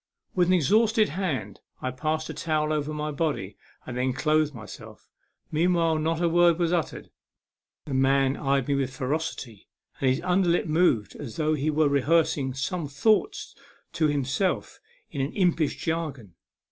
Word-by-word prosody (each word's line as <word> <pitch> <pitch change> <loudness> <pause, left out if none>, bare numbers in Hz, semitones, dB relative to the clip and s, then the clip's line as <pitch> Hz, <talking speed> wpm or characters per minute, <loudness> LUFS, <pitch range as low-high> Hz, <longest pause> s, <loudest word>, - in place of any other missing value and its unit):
With 180 -2 +2
an 185 - +4
exhausted 215 - +3
hand 145 - -3 0.2
I 130 - -3
passed 155 +4 -2
a - - -6
towel 155 -1 -1
over 150 0 -2
my 150 0 -3
body 145 - -2 0.3
and 125 - -6
then 125 +1 0
clothed 155 +2 +1
myself. 110 -7 -11 0.4
Meanwhile, 165 0 +2
not 160 +1 0
a - - +4
word 170 0 +4
was 175 -1 +1
uttered. 170 -3 -3 0.7
The 140 - -5
man 135 0 +3
eyed 135 -2 0
me 140 - +1
with 135 -1 -1
ferocity, 135 -6 -4 0.3
and 135 - +2
his 130 +3 +1
under 180 0 +2
lip 170 - +2
moved 155 - +1
as 130 -7 -7
though 155 -1 +1
he 150 0 0
were 155 0 +3
rehears 145 +4 +2
ing 130 -3 -3
some 150 +4 -3
thoughts 210 - +1 0.4
to 155 - +2
himself 145 +6 -1 0.3
in 140 - -3
an 135 - -2
impish 175 -6 +1
jargon. 150 - -4
155 Hz, 165 wpm, -26 LUFS, 135-170 Hz, 0.7 s, an